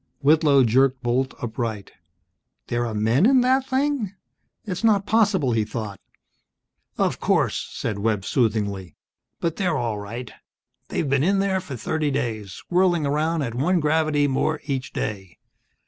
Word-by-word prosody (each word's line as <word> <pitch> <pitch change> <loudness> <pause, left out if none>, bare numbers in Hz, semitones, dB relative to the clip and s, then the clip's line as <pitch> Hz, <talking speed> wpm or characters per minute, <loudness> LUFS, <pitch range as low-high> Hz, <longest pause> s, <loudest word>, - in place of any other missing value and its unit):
Whitlow 145 -2 +5
jerked 130 +2 +2
bolt 130 +2 0
upright. 110 -4 -4 0.8
"There 120 0 0
are 115 - -4
men 115 - +3
in 260 -1 +5
that 260 +1 +2
thing?" 265 -7 -1 0.5
It's 185 0 -4
not 205 -3 +3
possible, 205 - +2
he 115 -2 +2
thought. 105 -2 -6 1.0
"Of - - 0
course," - - 0
said 105 -3 -3
Webb, 105 -2 0
soothingly. 105 -6 -1 0.4
"But 165 -1 -2
they're 180 -6 0
all 115 -3 -2
right. 115 +4 -7 0.6
They've 155 - -2
been 140 0 +2
in 195 +4 +2
there 195 -1 +1
for 140 -6 -7
thirty 150 +6 -1
days, 110 -7 -3
whirling 175 -3 +3
around 155 +2 0
at 115 -4 -3
one 165 +9 +1
gravity 150 -1 +2
more 135 - 0
each 135 -2 -3
day. 95 -5 -5
135 Hz, 145 wpm, -23 LUFS, 115-180 Hz, 1.0 s, Whitlow